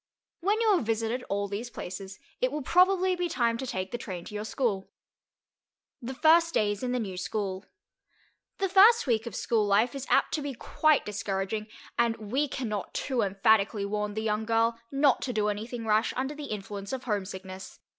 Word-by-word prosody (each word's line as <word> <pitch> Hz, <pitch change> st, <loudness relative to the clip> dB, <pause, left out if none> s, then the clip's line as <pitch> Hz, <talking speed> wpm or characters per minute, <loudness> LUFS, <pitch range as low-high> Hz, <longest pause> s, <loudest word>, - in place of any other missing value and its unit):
When 405 Hz, +5 st, +1 dB
you 435 Hz, -3 st, +4 dB
have 345 Hz, -, 0 dB
visited 225 Hz, +2 st, -1 dB
all 200 Hz, +1 st, -1 dB
these 210 Hz, +5 st, -5 dB
places, 190 Hz, -2 st, -7 dB, 0.2 s
it 255 Hz, -, +2 dB
will 295 Hz, 0 st, -3 dB
probably 370 Hz, +3 st, +4 dB
be 355 Hz, -1 st, -1 dB
time 235 Hz, -7 st, +1 dB
to 265 Hz, -, -4 dB
take 185 Hz, -4 st, -3 dB
the 240 Hz, -, -3 dB
train 180 Hz, -6 st, -6 dB
to -, -, -10 dB
your 210 Hz, 0 st, -4 dB
school. 215 Hz, -5 st, -1 dB, 1.1 s
THE 255 Hz, +2 st, -5 dB
FIRST 330 Hz, +3 st, +4 dB
DAYS 205 Hz, -2 st, +1 dB
IN 250 Hz, -1 st, -1 dB
THE 250 Hz, -, 0 dB
NEW 195 Hz, -5 st, -4 dB
SCHOOL 190 Hz, +1 st, -3 dB, 0.9 s
The 390 Hz, -, +1 dB
first 410 Hz, +5 st, +6 dB
week 230 Hz, -3 st, +1 dB
of -, -, -6 dB
school 225 Hz, -2 st, +1 dB
life 215 Hz, +5 st, +3 dB
is 275 Hz, -1 st, -6 dB
apt -, -, +3 dB
to 310 Hz, -, 0 dB
be 285 Hz, -2 st, -4 dB
quite 310 Hz, +4 st, +2 dB
discouraging, 205 Hz, +1 st, -3 dB, 0.3 s
and 235 Hz, -1 st, +3 dB
we 250 Hz, +8 st, -1 dB
can 260 Hz, -2 st, -4 dB
not 210 Hz, -2 st, -4 dB
too 260 Hz, -4 st, 0 dB
emphatically 200 Hz, +1 st, +2 dB
warn 210 Hz, 0 st, -2 dB
the 220 Hz, -, -2 dB
young 215 Hz, 0 st, 0 dB
girl 230 Hz, +1 st, +1 dB
not 275 Hz, -1 st, +3 dB
to 250 Hz, -, -2 dB
do 210 Hz, -1 st, +1 dB
anything 225 Hz, +3 st, -4 dB
rash 215 Hz, 0 st, +2 dB
under 265 Hz, +3 st, -1 dB
the 295 Hz, 0 st, -7 dB
influence 205 Hz, -3 st, -6 dB
of 260 Hz, -1 st, -4 dB
homesickness. 190 Hz, -3 st, -5 dB
225 Hz, 195 wpm, -28 LUFS, 205-270 Hz, 1.1 s, first